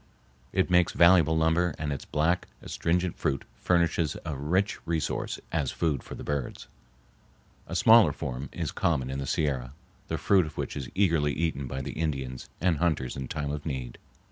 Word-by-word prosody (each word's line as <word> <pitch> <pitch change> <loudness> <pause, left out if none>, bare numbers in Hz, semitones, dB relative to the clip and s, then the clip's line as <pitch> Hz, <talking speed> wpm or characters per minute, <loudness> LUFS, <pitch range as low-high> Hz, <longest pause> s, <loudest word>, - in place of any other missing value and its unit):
It 95 -1 +1
makes 90 -1 +4
valuable 85 -2 +5
lumber 80 +1 +2
and 75 -2 -2
its 70 - -6
black, 85 +4 +1 0.2
astringent 90 +1 -1
fruit 70 - -1
furnishes 85 -3 +1
a 80 - -3
rich 90 +10 0
resource 80 -3 -2
as 75 -5 0
food 75 -6 -1
for - - -9
the - - -8
birds. 70 -3 -3 1.0
A - - -5
smaller 110 -8 +7
form 65 0 -5
is - - -3
common 65 -6 0
in 65 - -3
the 70 - -4
Sierra, 65 -5 -1 0.3
the - - -2
fruit 95 -5 +3
of 75 - -11
which - - -3
is 70 -4 -5
eagerly 85 -7 +2
eaten 75 -4 -1
by 65 +1 -4
the - - -4
Indians 65 -5 -3
and 85 -1 +2
hunters 80 -7 0
in 65 -1 -5
time 75 -1 -3
of 75 0 -4
need. 65 -6 -5
75 Hz, 175 wpm, -28 LUFS, 70-85 Hz, 1.0 s, smaller